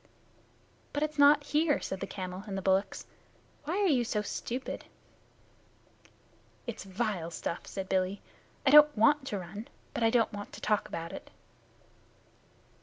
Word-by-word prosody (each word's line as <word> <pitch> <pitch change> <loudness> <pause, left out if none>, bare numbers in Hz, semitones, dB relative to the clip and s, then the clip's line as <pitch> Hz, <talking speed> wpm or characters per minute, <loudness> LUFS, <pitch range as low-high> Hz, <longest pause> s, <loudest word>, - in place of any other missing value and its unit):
"But 290 - 0
it 305 - 0
is 305 - -12
not 290 +1 +7
here," 300 +1 +2
said 190 - -4
the - - -4
camel 185 0 -6
and 195 -1 -4
the - - -2
bullocks. 190 +1 +1 0.6
"Why 335 +6 -1
are 410 - +2
you 270 -9 +3
so 210 -2 -1
stupid?" 250 +4 -4 1.8
"It's 235 -5 -5
vile 195 -4 -2
stuff," 170 0 -5
said 190 -1 -5
Billy. 190 +1 0 0.5
"I 270 - +5
don't 300 -2 +8
want 270 +5 +4
to 210 - -2
run, 195 +5 -7 0.3
but - - -3
I 225 - +5
don't 230 -2 +2
want 205 0 -7
to - - -8
talk 210 -1 +1
about 165 0 -6
it." - - -9
215 Hz, 160 wpm, -30 LUFS, 190-285 Hz, 1.8 s, don't